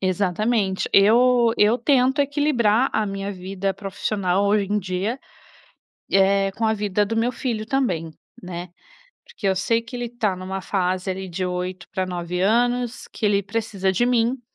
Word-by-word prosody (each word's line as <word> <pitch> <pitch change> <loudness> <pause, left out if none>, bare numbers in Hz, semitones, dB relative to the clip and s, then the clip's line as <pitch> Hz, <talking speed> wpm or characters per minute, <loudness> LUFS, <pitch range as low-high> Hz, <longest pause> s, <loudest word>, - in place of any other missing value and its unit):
Exatamente. 195 +2 0
Eu 235 +3 +5
eu 210 +3 +4
tento 265 +2 +2
equilibrar 270 -5 +2
a 220 - +1
minha 195 0 -4
vida 190 +1 -3
profissional 195 -1 -1
hoje 205 0 +2
em 210 - +2
dia, 195 +6 -3 0.9
eh, 195 0 +3
com 225 +3 -1
a 220 - +2
vida 205 -1 0
do 225 +2 -3
meu 235 +2 +1
filho 230 -5 -3
também, 180 -12 -1 0.3
né, 180 0 -6 0.6
porque 200 - -5
eu 190 - +2
sei 230 +5 +1
que 230 +2 -10
ele 245 0 -3
está 225 -5 -1
em 185 - -10
uma 190 +1 -4
fase 185 0 -1
ali 190 0 -6
de 185 +2 -3
8 180 +1 -4
para 185 -1 -2
9 180 0 -4
anos, 240 +3 +1
que 225 - -4
ele 200 -1 +2
precisa 200 -2 -1
de 190 +6 +1
mim. 245 +1 +1
200 Hz, 170 wpm, -22 LUFS, 185-235 Hz, 0.9 s, Eu